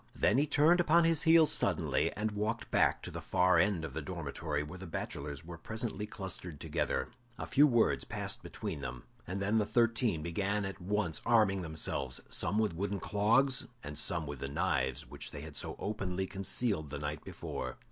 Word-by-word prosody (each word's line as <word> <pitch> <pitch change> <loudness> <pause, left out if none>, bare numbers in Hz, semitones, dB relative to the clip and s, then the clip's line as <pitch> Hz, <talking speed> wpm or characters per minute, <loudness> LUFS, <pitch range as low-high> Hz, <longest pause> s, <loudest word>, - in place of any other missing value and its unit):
Then 115 +6 +3
he 150 - +2
turned 155 +4 +5
upon 170 0 +5
his 165 -2 +3
heel 165 0 +7
suddenly, - - +2
and 110 +1 0
walked 105 +3 -2
back - - +3
to - - -6
the - - -6
far 90 +1 +3
end 95 -6 +2
of 70 - -7
the - - -3
dormitory, 75 -2 -3
where 90 +5 -9
the 95 - -8
bachelors 75 -1 -5
were 85 -1 -8
presently 110 +1 -4
clustered 90 -6 -5
together. 80 -4 -1 0.3
A - - -4
few 145 +2 +5
words 120 -4 +3
passed - - -4
between 95 -9 -5
them, 65 -2 -6 0.2
and 90 +3 -3
then 105 +3 +2
the - - +3
thirteen 115 -8 +2
began 100 +4 -1
at 95 -1 -6
once 100 -3 0
arming 110 -5 +3
themselves, 80 -5 -2
some 105 - -1
with 110 -4 +2
wooden 100 +3 -2
clogs, 125 +8 +2 0.2
and 75 0 -6
some 80 +1 +1
with 70 -2 -6
the 70 - -3
knives 70 -6 0
which 70 +3 -7
they 70 - -8
had 75 -1 -9
so - - -2
openly 95 -3 -2
concealed 95 -3 -1
the 70 - -5
night 75 +1 -4
before. - - -5
95 Hz, 190 wpm, -33 LUFS, 80-110 Hz, 0.3 s, heel